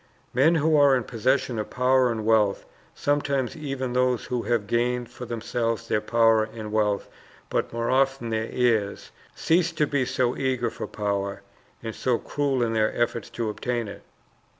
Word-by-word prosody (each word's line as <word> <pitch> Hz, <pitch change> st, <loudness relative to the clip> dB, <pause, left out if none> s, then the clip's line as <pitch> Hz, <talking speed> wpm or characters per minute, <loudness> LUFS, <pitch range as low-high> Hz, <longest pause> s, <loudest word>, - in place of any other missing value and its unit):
Men 145 Hz, +7 st, +4 dB
who 160 Hz, 0 st, +3 dB
are 140 Hz, -2 st, +6 dB
in 125 Hz, -, 0 dB
possession 130 Hz, +1 st, 0 dB
of 105 Hz, -, -4 dB
power 125 Hz, 0 st, +3 dB
and 110 Hz, -2 st, -3 dB
wealth, 110 Hz, -3 st, +2 dB, 0.3 s
sometimes 140 Hz, -2 st, 0 dB
even 135 Hz, -5 st, -4 dB
those 125 Hz, -1 st, +1 dB
who 125 Hz, -1 st, -2 dB
have 115 Hz, -3 st, 0 dB
gained 120 Hz, +2 st, 0 dB
for 125 Hz, -, -8 dB
themselves 115 Hz, 0 st, -2 dB
their 105 Hz, -, +1 dB
power 115 Hz, 0 st, +3 dB
and 110 Hz, -1 st, -7 dB
wealth, 105 Hz, -2 st, +1 dB, 0.4 s
but -, -, -1 dB
more 115 Hz, +1 st, -1 dB
often 135 Hz, -3 st, +1 dB
their 110 Hz, 0 st, -1 dB
heirs, 115 Hz, -5 st, 0 dB, 0.2 s
cease 170 Hz, +1 st, +2 dB
to 150 Hz, -, +2 dB
be 140 Hz, -3 st, 0 dB
so 125 Hz, 0 st, 0 dB
eager 130 Hz, -3 st, -1 dB
for -, -, -6 dB
power, 100 Hz, -1 st, -3 dB, 0.4 s
and 115 Hz, -1 st, -4 dB
so 125 Hz, +1 st, 0 dB
cruel 140 Hz, -2 st, -1 dB
in 115 Hz, -1 st, 0 dB
their 110 Hz, -1 st, +2 dB
efforts 120 Hz, -1 st, -1 dB
to 115 Hz, -, -3 dB
obtain 120 Hz, +1 st, -3 dB
it. 100 Hz, -, -9 dB
120 Hz, 175 wpm, -25 LUFS, 110-130 Hz, 0.4 s, are